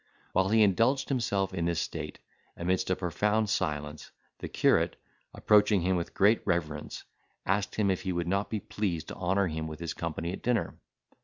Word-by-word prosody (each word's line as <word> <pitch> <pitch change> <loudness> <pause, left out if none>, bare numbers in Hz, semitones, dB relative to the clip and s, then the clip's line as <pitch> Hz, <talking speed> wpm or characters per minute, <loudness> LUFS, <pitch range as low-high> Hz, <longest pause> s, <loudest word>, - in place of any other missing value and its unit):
While 95 +1 +2
he 110 +1 +5
indulged 115 +8 +2
himself 100 -8 0
in 85 -3 -1
this 85 -1 0
state, - - -4 0.4
amidst 90 +2 0
a 95 - +2
profound 105 +4 0
silence, 75 -4 -2 0.3
the - - -5
curate, - - +2 0.4
approaching 105 -2 +4
him 95 +2 +1
with 85 -1 -3
great 105 +4 +4
reverence, 80 -5 -2 0.4
asked 100 +1 0
him 100 -3 +2
if 95 - -1
he 95 - -2
would 85 -1 -2
not 100 +3 0
be 110 - -2
pleased 90 -7 -3
to - - -6
honour 95 +2 +1
him 80 -2 -3
with 80 -1 -7
his 85 -2 -4
company 85 +1 -4
at - - -7
dinner? 120 -2 0
95 Hz, 180 wpm, -29 LUFS, 85-105 Hz, 0.4 s, he